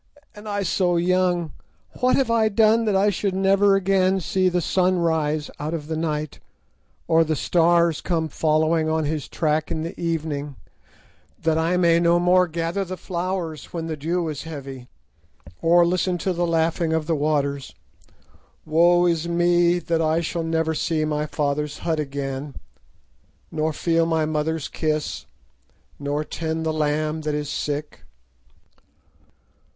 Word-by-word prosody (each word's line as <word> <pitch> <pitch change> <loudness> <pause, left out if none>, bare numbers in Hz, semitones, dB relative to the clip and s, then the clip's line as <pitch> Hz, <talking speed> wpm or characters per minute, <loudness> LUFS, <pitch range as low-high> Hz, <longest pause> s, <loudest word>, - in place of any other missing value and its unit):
and 210 +1 -10
I 205 -1 -1
so 180 -1 +1
young! 175 -2 +1 0.5
What 255 0 +3
have 260 -4 +1
I 225 -1 +3
done 220 +2 +3
that 210 -2 +1
I 200 +2 +3
should 195 0 -2
never 195 +1 +4
again 190 0 +2
see 185 +1 +1
the 180 0 0
sun 185 +2 +1
rise 155 -3 0
out 155 +3 -3
of 150 -3 -6
the 160 +1 -4
night, 155 -2 -3 0.7
or 165 0 +4
the 160 -1 -1
stars 170 0 +2
come 165 -3 -1
following 155 +1 +1
on 160 0 0
his 150 -1 -3
track 155 -1 -1
in 160 - -3
the 165 - -5
evening, 155 -4 -3 0.9
that 160 0 +2
I 170 +3 +1
may 170 -2 +4
no 170 0 +3
more 180 +1 +4
gather 170 +3 -2
the 185 0 -6
flowers 175 -3 -4
when 165 -2 -3
the 160 -1 -3
dew 165 +3 -2
is 150 -3 -4
heavy, 135 -5 -8 0.7
or 170 +1 +5
listen 180 +1 0
to 185 +2 -1
the 175 0 -1
laughing 165 0 +1
of 160 -1 0
the 165 - 0
waters? 140 -2 -1 0.9
Woe 175 +3 +4
is 170 -1 0
me, 175 0 +3
that 165 -2 -1
I 160 +1 +2
shall 170 0 -3
never 160 0 0
see 155 0 0
my 150 0 -1
father's 150 0 -2
hut 160 -2 0
again, 140 -1 -4 1.0
nor 155 0 -1
feel 165 +2 +1
my 160 -1 +1
mother's 155 0 -2
kiss, 155 -1 -3 0.7
nor 145 +1 -2
tend 160 +1 -4
the 160 - 0
lamb 155 +1 -1
that 150 -1 -2
is 150 -1 -3
sick! 150 +1 -4
165 Hz, 155 wpm, -23 LUFS, 155-175 Hz, 1.0 s, or